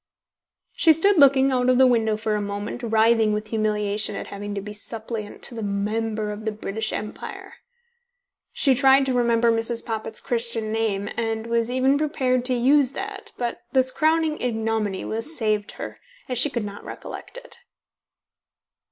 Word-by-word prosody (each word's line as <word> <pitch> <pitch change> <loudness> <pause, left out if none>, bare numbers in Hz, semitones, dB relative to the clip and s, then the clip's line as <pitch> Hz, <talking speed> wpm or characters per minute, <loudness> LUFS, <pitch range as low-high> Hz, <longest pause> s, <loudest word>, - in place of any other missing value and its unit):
She 320 - +5
stood 375 +3 +4
looking 270 -1 +6
out 250 -1 +2
of 255 - +4
the 260 - +7
window 225 -4 +2
for 215 0 -1
a 210 - 0
moment, 205 +3 -4
writhing 225 -1 +3
with 210 +1 -3
humiliation 210 -1 -1
at - - -5
having 205 +1 -5
to - - -2
be 210 +1 -8
suppliant 220 0 -6
to - - -8
the 230 - -5
Member 210 +1 -2
of 210 +1 -7
the 220 - -1
British 215 +1 -3
Empire. 210 0 -6 1.0
She 275 - +3
tried 270 +1 +5
to 260 - 0
remember 235 -1 +3
Mrs. 230 +1 0
Poppit's 220 -1 -3
Christian 230 -2 -1
name, 215 -3 -1
and 225 -1 -2
was 230 0 0
even 260 +3 +2
prepared 255 -5 0
to 255 0 +1
use 265 +2 +3
that, 400 +4 -6
but 240 -1 -3
this 260 -1 +3
crowning 315 0 +1
ignominy 220 -4 -1
was 230 +9 -2
saved 215 -3 -1
her, - - -8 0.3
as 250 -2 0
she 295 - +3
could 235 -6 -3
not 205 0 -8
recollect - - -9
it. - - -12
230 Hz, 170 wpm, -24 LUFS, 215-255 Hz, 1.0 s, the